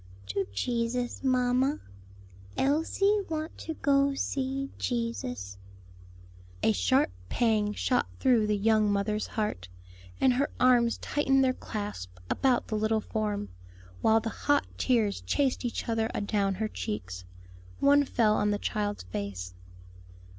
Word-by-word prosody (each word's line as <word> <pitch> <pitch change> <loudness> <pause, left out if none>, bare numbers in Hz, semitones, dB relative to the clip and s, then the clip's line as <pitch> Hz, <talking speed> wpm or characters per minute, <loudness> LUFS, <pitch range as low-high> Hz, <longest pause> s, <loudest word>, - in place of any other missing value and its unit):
"To 130 +6 -1
Jesus, 240 - -2
mamma; 255 +2 +2 0.8
Elsie 325 +9 +2
want 315 0 -3
to 320 - -5
go 275 -1 +2
see 275 0 -2
Jesus." 125 - -3 1.0
A - - +5
sharp 90 -2 +2 0.2
pang 215 -3 +1
shot 250 +3 +1
through 240 -5 +3
the 210 0 +1
young 215 0 +3
mothers 210 +1 0
heart, 210 - -3 0.5
and 255 - +4
her 275 +3 +1
arms 245 -2 +4
tightened 270 -2 +2
their 255 -1 +3
clasp 205 - -6
about 255 -3 +2
the 215 - -2
little 220 +1 +1
form, 210 - -2 0.5
while 220 0 +5
the 225 +1 -3
hot 290 +5 +1
tears 225 -6 +1
chased 275 -3 0
each 240 - -3
other 225 -1 0
adown 200 -1 0
her 215 +3 -1
cheeks. 90 - -5 0.6
One 285 +1 +5
fell 225 -5 +2
on 210 - +1
the 205 - +1
child's 205 0 -2
face. 90 -1 -5
225 Hz, 130 wpm, -29 LUFS, 205-260 Hz, 1.0 s, A